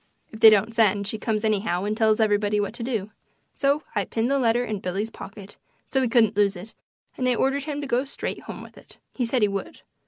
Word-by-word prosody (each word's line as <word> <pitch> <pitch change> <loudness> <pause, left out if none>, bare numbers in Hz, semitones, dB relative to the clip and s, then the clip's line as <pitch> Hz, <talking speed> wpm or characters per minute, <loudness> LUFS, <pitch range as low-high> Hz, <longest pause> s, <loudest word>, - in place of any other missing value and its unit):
If 220 - -10
they 220 - +10
don't 215 +1 +2
send 205 -3 +2
she 215 +2 -4
comes 215 -1 -1
anyhow 200 -4 0
and 210 +1 -1
tells 220 -1 +2
everybody 210 -1 +2
what 205 +1 -2
to 240 - -10
do. 225 -4 -3 0.4
So 280 +2 +1
I 205 -3 0
pinned 230 +6 -1
the 280 - +2
letter 240 0 +2
in 215 -3 -3
Billy's 195 +5 -3
pocket, 200 -1 -11 0.3
so 265 - 0
he 255 - +1
couldn't 230 -4 +3
lose 200 -1 +2
it, 185 +5 -10 0.5
and 255 -1 +1
I 250 - +2
ordered 270 +3 0
him 295 -1 -4
to - - -4
go 250 0 +1
straight 280 - -5
home - - -8
with - - -14
it. - - -17 0.2
He 245 -3 -1
said 240 -1 +1
he - - +5
would. 200 -1 -5
220 Hz, 240 wpm, -24 LUFS, 205-245 Hz, 0.5 s, they